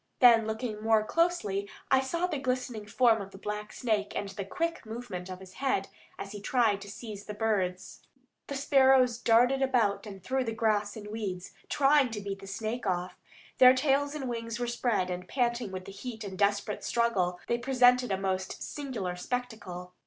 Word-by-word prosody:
Then, 230 Hz, -4 st, +7 dB
looking 220 Hz, -1 st, -3 dB
more 220 Hz, -1 st, +3 dB
closely, 215 Hz, -, 0 dB, 0.2 s
I 265 Hz, 0 st, +6 dB
saw 335 Hz, +7 st, -1 dB
the 320 Hz, -6 st, -2 dB
glistening 255 Hz, -5 st, -2 dB
form 225 Hz, -1 st, +3 dB
of 195 Hz, -, -7 dB
the 195 Hz, -, -12 dB
black 210 Hz, +1 st, -5 dB
snake 215 Hz, -4 st, -1 dB
and 200 Hz, -, -2 dB
the 195 Hz, +1 st, -5 dB
quick 330 Hz, -, -2 dB
movement 220 Hz, -6 st, -6 dB
of 185 Hz, 0 st, -6 dB
his 190 Hz, -1 st, -13 dB
head 230 Hz, -8 st, 0 dB, 0.3 s
as 200 Hz, -, -7 dB
he 205 Hz, -, -7 dB
tried 220 Hz, -3 st, +2 dB
to 200 Hz, -, -9 dB
seize 210 Hz, -1 st, -8 dB
the 210 Hz, -, -6 dB
birds. 195 Hz, -4 st, -1 dB, 0.5 s
The 280 Hz, -, -4 dB
sparrows 265 Hz, -3 st, +4 dB
darted 245 Hz, +4 st, +4 dB
about 235 Hz, -6 st, +1 dB
and 195 Hz, -3 st, -9 dB
through 260 Hz, +2 st, 0 dB
the 225 Hz, -, -2 dB
grass 215 Hz, -2 st, 0 dB
and 210 Hz, -1 st, -8 dB
weeds, 195 Hz, -5 st, -4 dB, 0.2 s
trying 280 Hz, -1 st, +4 dB
to 210 Hz, -, -3 dB
beat 195 Hz, -1 st, -5 dB
the 195 Hz, -, -11 dB
snake 220 Hz, +3 st, -3 dB
off. 180 Hz, -1 st, -1 dB, 0.4 s
Their 255 Hz, 0 st, +9 dB
tails 285 Hz, +2 st, +1 dB
and 275 Hz, -4 st, -4 dB
wings 230 Hz, -1 st, -4 dB
were 245 Hz, -, 0 dB
spread, 235 Hz, -6 st, 0 dB
and, 180 Hz, 0 st, -5 dB
panting 240 Hz, -4 st, 0 dB
with 185 Hz, -1 st, -6 dB
the -, -, -8 dB
heat 220 Hz, +3 st, -7 dB
and 200 Hz, -2 st, -6 dB
the -, -, -8 dB
desperate 205 Hz, +1 st, 0 dB
struggle, 190 Hz, -7 st, +1 dB
they 235 Hz, -, 0 dB
presented 250 Hz, -1 st, +4 dB
a 190 Hz, -, +1 dB
most 190 Hz, -1 st, -2 dB
singular 235 Hz, -11 st, -4 dB
spectacle. 185 Hz, -5 st, -5 dB
220 Hz, 190 wpm, -29 LUFS, 195-250 Hz, 0.5 s, Their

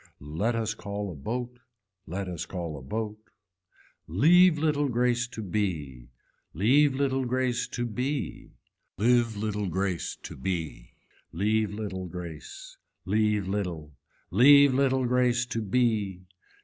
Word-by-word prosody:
Let 85 Hz, +11 st, -1 dB
us 110 Hz, -2 st, -1 dB
call 100 Hz, -2 st, -5 dB
a -, -, -8 dB
boat, 125 Hz, -, -5 dB, 0.5 s
let 95 Hz, +3 st, -4 dB
us 90 Hz, -3 st, -5 dB
call 85 Hz, -4 st, -5 dB
a 70 Hz, -, -8 dB
boat. 105 Hz, -, -4 dB, 0.9 s
Leave 165 Hz, -, +5 dB
little 145 Hz, -2 st, +1 dB
grace 120 Hz, 0 st, +1 dB
to 115 Hz, -3 st, -7 dB
be. 80 Hz, -, -3 dB, 0.5 s
Leave 130 Hz, -, +4 dB
little 135 Hz, -1 st, 0 dB
grace 125 Hz, 0 st, 0 dB
to 120 Hz, -, -3 dB
bea, 130 Hz, +5 st, -3 dB, 0.5 s
live 115 Hz, +1 st, +2 dB
little 105 Hz, -1 st, -2 dB
grace 95 Hz, 0 st, -2 dB
to -, -, -8 dB
bee. 80 Hz, -5 st, -4 dB, 0.4 s
Leave 105 Hz, +3 st, +1 dB
little 95 Hz, -4 st, -4 dB
grace. 85 Hz, -3 st, -9 dB, 0.3 s
Leave 105 Hz, 0 st, +1 dB
little. 85 Hz, -7 st, -4 dB, 0.4 s
Leave 140 Hz, -, +7 dB
little 130 Hz, -1 st, +2 dB
grace 125 Hz, 0 st, +2 dB
to 115 Hz, -2 st, -3 dB
be. 105 Hz, -4 st, 0 dB
110 Hz, 125 wpm, -27 LUFS, 95-125 Hz, 0.9 s, Leave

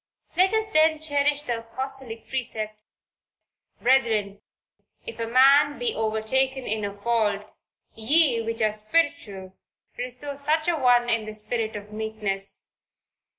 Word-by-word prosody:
Let 375 Hz, +2 st, +4 dB
us 440 Hz, 0 st, +1 dB
then 315 Hz, 0 st, +4 dB
cherish 290 Hz, -1 st, 0 dB
the 240 Hz, -4 st, -2 dB
apostolic 255 Hz, 0 st, -6 dB
precept, 220 Hz, -5 st, -3 dB, 1.0 s
"Brethren 220 Hz, -6 st, +1 dB, 0.6 s
if 470 Hz, -, -8 dB
a 230 Hz, -, -2 dB
man 275 Hz, +4 st, +5 dB
be 475 Hz, -2 st, -1 dB
overtaken 245 Hz, +5 st, -1 dB
in 215 Hz, 0 st, -1 dB
a 200 Hz, 0 st, -5 dB
fault, 210 Hz, -2 st, 0 dB, 0.5 s
ye 250 Hz, +1 st, +3 dB
which 225 Hz, 0 st, -2 dB
are 215 Hz, -1 st, +2 dB
spiritual 215 Hz, -, -1 dB, 0.4 s
restore 255 Hz, +3 st, -3 dB
such 310 Hz, +3 st, 0 dB
an 335 Hz, -4 st, 0 dB
one 245 Hz, -1 st, +4 dB
in 230 Hz, -2 st, 0 dB
the 215 Hz, 0 st, -5 dB
spirit 220 Hz, +1 st, -2 dB
of 205 Hz, 0 st, -8 dB
meekness." 210 Hz, -3 st, -3 dB
235 Hz, 130 wpm, -25 LUFS, 215-285 Hz, 1.0 s, man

